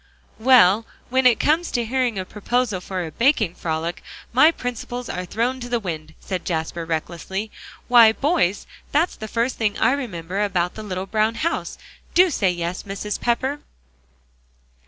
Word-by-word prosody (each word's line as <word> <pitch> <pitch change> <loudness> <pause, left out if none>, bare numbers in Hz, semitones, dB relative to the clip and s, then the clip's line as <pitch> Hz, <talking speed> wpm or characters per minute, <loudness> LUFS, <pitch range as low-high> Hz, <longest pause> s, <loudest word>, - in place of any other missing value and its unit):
"Well, 225 -3 +5 0.2
when 260 0 +4
it 235 -4 +4
comes 325 +3 +2
to 240 -2 -1
hearing 245 -2 0
a 185 - -3
proposal 215 -1 -1
for 185 -1 -4
a 160 - -7
baking 230 - +2
frolic, 165 0 -3 0.3
my 265 +6 +7
principles 245 -4 -5
are 180 0 -4
thrown 240 +7 -1
to 245 -1 -7
the 240 -1 +1
wind," 160 -5 -6
said 185 -2 -4
Jasper 165 0 -3
recklessly. 170 +6 -4 0.4
"Why, 235 -3 +8
boys, 245 - 0 0.3
that's 320 +5 +1
the 220 - -7
first 235 +3 -1
thing 210 -3 0
I 230 - +3
remember 195 -9 -3
about 180 -3 0
the 220 - -8
little 190 -3 -4
brown 215 +2 +1
house. 330 +9 -2 0.4
Do 365 0 +6
say 200 -9 +2
yes, 175 0 -3
Mrs. 200 +1 -5
Pepper!" 260 +4 0
220 Hz, 160 wpm, -22 LUFS, 180-250 Hz, 0.4 s, Why